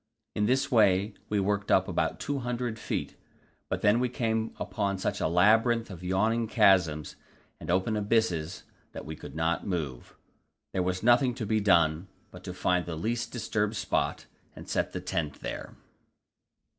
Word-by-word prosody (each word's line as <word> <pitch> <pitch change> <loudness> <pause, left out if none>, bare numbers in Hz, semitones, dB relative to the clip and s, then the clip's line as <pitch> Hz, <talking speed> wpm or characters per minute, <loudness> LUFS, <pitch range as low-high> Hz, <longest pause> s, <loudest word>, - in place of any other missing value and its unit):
In 105 -1 +1
this 130 +3 +1
way 100 -3 +4 0.2
we 105 - +1
worked 100 +1 -1
up - - +4
about - - -1
200 125 -4 -3
feet, - - -3 0.5
but - - -2
then 105 +3 +4
we 125 0 +1
came 110 -2 -1
upon 100 -1 -2
such 95 - -2
a - - +2
labyrinth 110 +6 +3
of 90 -1 -9
yawning 110 +5 +1
chasms 90 -9 +3 0.4
and 80 - -9
open 95 +5 +1
abysses 100 -6 0 0.3
that - - -7
we 80 - -6
could 75 - -10
not 80 +3 -1
move. 75 -10 -4 0.6
There 95 - 0
was 90 +1 -2
nothing 120 +1 +4
to 115 - -4
be 110 +1 +1
done 85 -3 +3 0.2
but 90 0 -12
to 90 - -5
find 90 -1 +1
the 85 - -4
least 115 +8 -2
disturbed 110 -3 -1
spot, - - -1 0.3
and - - -11
set - - -1
the - - -5
tent 75 -4 -3
there. - - -6
100 Hz, 165 wpm, -28 LUFS, 90-115 Hz, 0.6 s, way